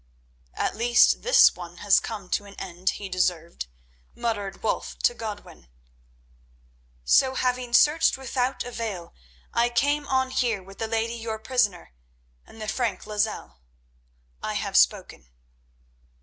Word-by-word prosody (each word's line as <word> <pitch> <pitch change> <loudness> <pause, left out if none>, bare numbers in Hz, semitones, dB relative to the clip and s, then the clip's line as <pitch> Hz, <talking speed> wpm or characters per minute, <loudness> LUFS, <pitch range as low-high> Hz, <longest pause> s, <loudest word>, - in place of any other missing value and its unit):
"At - - -1
least 240 +2 +4
this - - +6
one 175 -1 -10
has 205 +1 +4
come 210 -5 -7
to 205 - 0
an 200 0 -13
end 185 0 -3
he 205 - -6
deserved," 175 - -1 0.5
muttered 205 -5 -3
Wulf 220 - -2
to - - +2
Godwin. 210 - -8 1.4
"So, 260 - +4
having 250 -1 -1
searched 300 +6 +4
without 260 0 -2
avail, 225 -8 -5 0.4
I 235 +1 +2
came 285 +5 +1
on 260 0 +1
here 230 -7 0
with 195 +1 -14
the 225 - -2
lady 225 +1 -1
your 225 -1 -4
prisoner 220 - -1 0.5
and 225 - -15
the 215 - -5
Frank 215 -4 -2
Lozelle. 210 - -3 0.8
I - - -3
have - - -3
spoken." 60 0 +2
220 Hz, 135 wpm, -25 LUFS, 195-245 Hz, 1.4 s, this